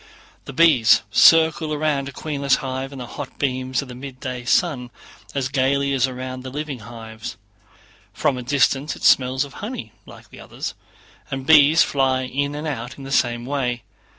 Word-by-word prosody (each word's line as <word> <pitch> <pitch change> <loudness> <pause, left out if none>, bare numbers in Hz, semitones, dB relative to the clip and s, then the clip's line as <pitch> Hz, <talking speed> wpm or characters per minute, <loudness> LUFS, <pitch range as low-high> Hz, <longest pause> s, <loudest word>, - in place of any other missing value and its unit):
The - - -7
bees 140 -7 +5
circle 160 +3 +5
round 145 -2 -1
a - - -8
queenless 140 -1 0
hive 130 +1 -4
in 140 - -9
the 125 - -6
hot 140 +3 -8
beams 130 -1 -1
of - - -12
the 125 - -9
midday 130 -1 -7
sun 130 -4 +1 0.5
as 135 -2 0
gaily 140 +1 +1
as 135 -1 +2
around 130 0 -6
the 130 - -7
living 145 -1 -5
hives; 110 -2 -9 0.7
from 135 - 0
a 125 - -5
distance 140 +2 +1
it - - -13
smells 130 +1 +3
of 140 - -13
honey 240 +5 -6 0.2
like - - -15
the - - -13
others, - - -6 0.6
and 135 -2 -5
bees 155 +1 +6
fly 130 -2 +1
in 140 +3 -2
and 150 +2 -5
out 125 -4 -5
in 140 - -10
the 135 - -8
same 120 -2 +1
way. 125 -3 -2
135 Hz, 180 wpm, -22 LUFS, 125-145 Hz, 0.7 s, bees